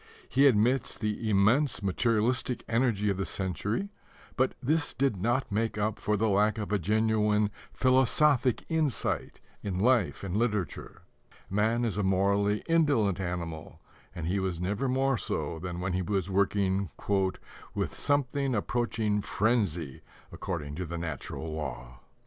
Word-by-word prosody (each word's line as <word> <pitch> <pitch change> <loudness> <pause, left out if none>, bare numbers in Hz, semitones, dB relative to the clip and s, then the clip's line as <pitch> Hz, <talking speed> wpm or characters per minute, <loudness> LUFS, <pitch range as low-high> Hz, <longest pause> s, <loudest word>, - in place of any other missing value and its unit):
He 140 +2 +4
admits 120 +1 +2
the 110 0 -2
immense 110 +5 +3
materialistic 115 +5 0
energy 115 -3 +1
of 95 - -2
the 95 - -1
century, 100 - -2 0.5
but 130 0 +1
this 150 +4 0
did 135 -4 +1
not 120 +7 0
make 110 +1 -1
up 105 0 -1
for 105 0 0
the 110 +2 +1
lack 105 +1 +2
of 105 -2 -4
a 105 - +2
genuine 105 +1 +2 0.2
philosophic 130 0 +3
insight 160 -5 -1 0.2
in 95 -3 -3
life 120 +1 +2
and 95 -1 -3
literature. 105 -5 -2 0.5
Man 110 +4 +1
is 105 -3 -2
a - - +1
morally 100 +2 +2
indolent 145 - +2
animal, 85 -4 -5 0.4
and 85 - -4
he 95 +4 0
was 95 -3 -2
never 100 +9 -1
more 135 -2 +1
so 85 -2 -2
than 90 0 -5
when 90 +1 -2
he 95 - 0
was 95 0 -1
working 100 -1 +1 0.9
"with - - -2
something 140 -2 0
approaching 110 -1 0
frenzy 100 - 0 0.3
according 80 -7 -4
to 90 - -3
the 85 +2 -4
natural 80 -1 -5
law." - - -6
105 Hz, 145 wpm, -29 LUFS, 95-120 Hz, 0.9 s, He